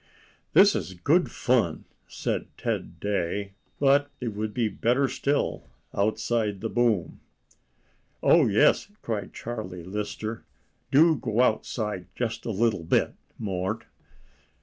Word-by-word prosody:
"This 200 Hz, 0 st, +7 dB
is 95 Hz, -1 st, -3 dB
good 155 Hz, -, +2 dB
fun," 115 Hz, -11 st, +1 dB, 0.2 s
said -, -, -3 dB
Ted -, -, -3 dB
Day, 100 Hz, 0 st, -2 dB, 0.3 s
"but 145 Hz, +1 st, +4 dB
it 125 Hz, -, -2 dB
would 105 Hz, 0 st, -3 dB
be 115 Hz, +1 st, 0 dB
better 120 Hz, +6 st, +1 dB
still 140 Hz, +2 st, -1 dB, 0.3 s
outside 110 Hz, 0 st, 0 dB
the 115 Hz, -, -3 dB
boom." 115 Hz, -9 st, +1 dB, 1.0 s
"Oh -, -, +6 dB
yes!" -, -, +4 dB, 0.2 s
cried 105 Hz, -4 st, -3 dB
Charlie 105 Hz, -7 st, -6 dB
Lister. 105 Hz, +4 st, -4 dB, 0.5 s
"Do 160 Hz, +2 st, +5 dB
go 115 Hz, -1 st, 0 dB
outside; 110 Hz, -5 st, 0 dB
just 120 Hz, -1 st, -3 dB
a -, -, -1 dB
little 110 Hz, -3 st, +1 dB
bit, 80 Hz, -, +2 dB, 0.2 s
Mort." 95 Hz, -3 st, -2 dB
110 Hz, 120 wpm, -26 LUFS, 100-120 Hz, 1.0 s, This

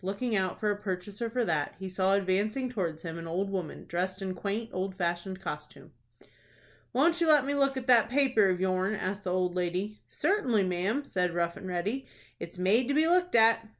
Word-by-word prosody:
Looking 210 Hz, +5 st, -2 dB
out 190 Hz, -2 st, -1 dB
for 210 Hz, -1 st, +1 dB
a -, -, 0 dB
purchaser 200 Hz, +4 st, -4 dB
for 245 Hz, +1 st, 0 dB
that, 150 Hz, -6 st, -1 dB
he 190 Hz, +1 st, -6 dB
saw 190 Hz, +1 st, +2 dB
advancing 205 Hz, +7 st, 0 dB
towards 170 Hz, -8 st, -3 dB
him 165 Hz, -1 st, -5 dB
an 165 Hz, -, -7 dB
old 190 Hz, +4 st, -2 dB
woman, 185 Hz, -5 st, -4 dB
dressed 185 Hz, +2 st, -2 dB
in 190 Hz, -1 st, -3 dB
quaint, 205 Hz, +5 st, -3 dB
old 190 Hz, +1 st, -3 dB
fashioned 175 Hz, +1 st, -2 dB
costume. -, -, -7 dB, 1.0 s
"Won't 330 Hz, +6 st, +2 dB
you 335 Hz, -, +3 dB
let 300 Hz, -4 st, +6 dB
me 285 Hz, -, -1 dB
look 275 Hz, -1 st, +2 dB
at 260 Hz, -, -4 dB
that 240 Hz, -3 st, +5 dB
paper 255 Hz, -6 st, +3 dB
of 180 Hz, -1 st, 0 dB
yourn?" 190 Hz, +2 st, +1 dB
asked 195 Hz, 0 st, -4 dB
the 180 Hz, -, -1 dB
old 180 Hz, -1 st, +1 dB
lady. 180 Hz, +4 st, -2 dB
"Certainly, 280 Hz, -, +1 dB
ma'am," 190 Hz, +10 st, -1 dB
said 180 Hz, -8 st, -1 dB
Rough 170 Hz, 0 st, 0 dB
and 190 Hz, -, -8 dB
Ready; 195 Hz, +9 st, -2 dB, 0.3 s
"it's 170 Hz, +2 st, -8 dB
made 205 Hz, +7 st, +3 dB
to 280 Hz, -, 0 dB
be 310 Hz, +1 st, +4 dB
looked 360 Hz, 0 st, +2 dB
at." 225 Hz, 0 st, +5 dB
195 Hz, 205 wpm, -29 LUFS, 185-240 Hz, 1.0 s, let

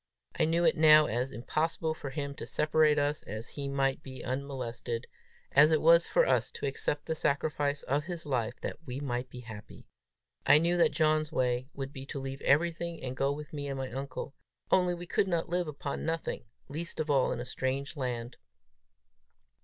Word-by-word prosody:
I -, -, +5 dB
knew 165 Hz, +2 st, +2 dB
it -, -, +4 dB
now 155 Hz, -1 st, +7 dB
as 125 Hz, 0 st, -1 dB
impossible 155 Hz, +5 st, -1 dB
for 145 Hz, -3 st, -6 dB
him 140 Hz, 0 st, -4 dB
to -, -, -6 dB
separate 150 Hz, 0 st, +3 dB
us 145 Hz, +1 st, 0 dB
that 110 Hz, +3 st, -5 dB
he 140 Hz, +4 st, -5 dB
might 135 Hz, 0 st, 0 dB
be 130 Hz, -3 st, -9 dB
unmolested, 125 Hz, -3 st, -4 dB, 0.5 s
as 150 Hz, +2 st, +7 dB
it 155 Hz, -1 st, +3 dB
was 170 Hz, +2 st, +6 dB
for -, -, +4 dB
us -, -, +2 dB
to -, -, -5 dB
accept 145 Hz, +1 st, -2 dB
the -, -, -1 dB
sacrifice 145 Hz, -1 st, 0 dB
of 145 Hz, +3 st, 0 dB
his 170 Hz, -2 st, -5 dB
life 125 Hz, -4 st, -1 dB
that -, -, -4 dB
we 130 Hz, -3 st, -5 dB
might 125 Hz, -2 st, -3 dB
be 125 Hz, -, -9 dB
happy. 110 Hz, -3 st, -11 dB, 0.5 s
I 145 Hz, -, +7 dB
knew 170 Hz, +3 st, +2 dB
that 170 Hz, -, +4 dB
John's 155 Hz, -1 st, +2 dB
way 125 Hz, -3 st, 0 dB
would 135 Hz, 0 st, -5 dB
be 135 Hz, 0 st, -8 dB
to 140 Hz, -, -5 dB
leave 135 Hz, +1 st, -5 dB
everything 170 Hz, +3 st, +1 dB
and 130 Hz, 0 st, -4 dB
go 135 Hz, +1 st, +1 dB
with 150 Hz, +1 st, -7 dB
me 145 Hz, -1 st, -3 dB
and 135 Hz, -1 st, -3 dB
my 130 Hz, -1 st, -4 dB
uncle, 135 Hz, +2 st, -5 dB, 0.4 s
only 180 Hz, -1 st, +4 dB
we 175 Hz, 0 st, -7 dB
could 195 Hz, -, +1 dB
not 170 Hz, -3 st, -1 dB
live 175 Hz, 0 st, 0 dB
upon 140 Hz, -1 st, -4 dB
nothing 165 Hz, -5 st, -2 dB, 0.2 s
least 160 Hz, +4 st, -6 dB
of 155 Hz, -1 st, 0 dB
all 135 Hz, -2 st, +3 dB
in -, -, -2 dB
a 120 Hz, -, -4 dB
strange 135 Hz, +4 st, -2 dB
land! 120 Hz, -3 st, -3 dB
140 Hz, 195 wpm, -30 LUFS, 130-155 Hz, 0.5 s, now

